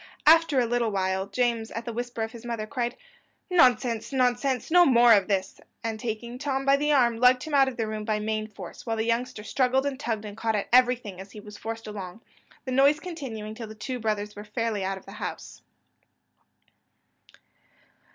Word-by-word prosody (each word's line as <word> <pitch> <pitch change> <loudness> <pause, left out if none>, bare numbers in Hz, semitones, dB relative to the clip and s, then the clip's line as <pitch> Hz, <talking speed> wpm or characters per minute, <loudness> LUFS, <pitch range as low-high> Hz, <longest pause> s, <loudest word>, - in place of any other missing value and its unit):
After 320 -3 +6
a 245 - +3
little 235 -1 0
while, 190 -1 -1
James, 230 +1 0
at 230 0 -6
the 235 - -4
whisper 240 -1 -4
of 220 - -4
his 235 0 -11
mother, 230 -3 -4
cried, 240 0 -3 0.5
"Nonsense, 245 -8 +3
nonsense! 255 0 0
no 355 +1 +7
more 240 -5 +6
of 200 -3 +3
this;" 195 -2 -2 0.2
and 225 -1 -3
taking 235 +1 -5
Tom 270 -1 -2
by 275 0 +5
the 295 +1 0
arm, 240 -5 +3
lugged 250 +1 +4
him 310 - -6
out 275 -1 +5
of 265 - -4
the 225 - 0
room 215 0 -4
by 215 0 0
main 215 0 -2
force; 195 -5 -10
whilst 225 -1 -2
the 220 - 0
youngster 235 -1 -1
struggled 260 +4 +1
and 275 -2 -3
tugged 220 -5 -3
and 205 -1 -8
caught 225 0 -1
at 205 - -2
everything 245 -6 +3
as 195 +1 -13
he 215 - -9
was 210 0 -11
forced 225 +1 -6
along, 205 -1 -7 0.4
the 260 - -4
noise 280 +3 +4
continuing 260 -12 -6
till 225 0 -7
the 215 - -10
two 250 +4 -5
brothers 210 -2 -2
were 205 - -8
fairly 215 -1 -2
out 190 +1 -2
of 190 - -14
the 195 - -11
house. - - -6
230 Hz, 200 wpm, -26 LUFS, 215-255 Hz, 0.5 s, no